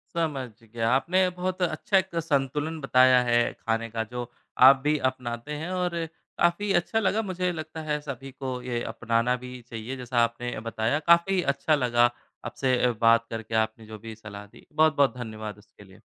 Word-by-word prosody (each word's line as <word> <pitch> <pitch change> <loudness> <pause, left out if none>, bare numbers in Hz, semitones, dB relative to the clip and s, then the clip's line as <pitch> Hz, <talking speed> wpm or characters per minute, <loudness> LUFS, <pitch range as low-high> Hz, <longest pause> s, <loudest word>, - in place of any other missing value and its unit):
समझ 145 -7 -1
गया। 115 0 -2
आपने 180 +8 +3
बहुत 180 +1 -4
अच्छा 180 +3 +1
एक 190 -2 -1
संतुलन 150 +2 -1
बताया 130 -1 +5
है, 120 -1 +3
खाने 115 0 -2
का 115 0 -2
जो 120 -1 -4 0.4
आप 135 - +9
भी 150 +1 +2
अपनाते 120 +2 -6
हैं 180 - -4
और 175 -2 -1 0.3
काफ़ी 195 +4 +2
अच्छा 220 +6 -1
लगा, 215 +1 +1
मुझे 185 -3 -2
लगता 160 -1 -6
है 150 -1 -1
सभी 135 -2 -7
को 130 -2 -5
ये 120 -1 -3
अपनाना 115 +1 +1
भी 125 -1 -8
चाहिए, 115 +3 -6
जैसा 125 -1 -1
आपने 115 0 -3
बताया। 115 +7 0
काफ़ी 180 +2 +4
अच्छा 145 +3 +1
लगा 120 -3 +3 0.4
आपसे 125 -2 +1
बात 115 0 +5
करके, 115 0 -5
आपने 110 0 0
जो 110 0 -9
भी 110 0 -9
सलाह 105 -2 -10
दी। 100 - -18
बहुत-बहुत 155 -4 +3
धन्यवाद 110 -3 -6
उसके 105 0 -18
लिए। 95 -1 -18
130 Hz, 175 wpm, -26 LUFS, 115-160 Hz, 0.4 s, आप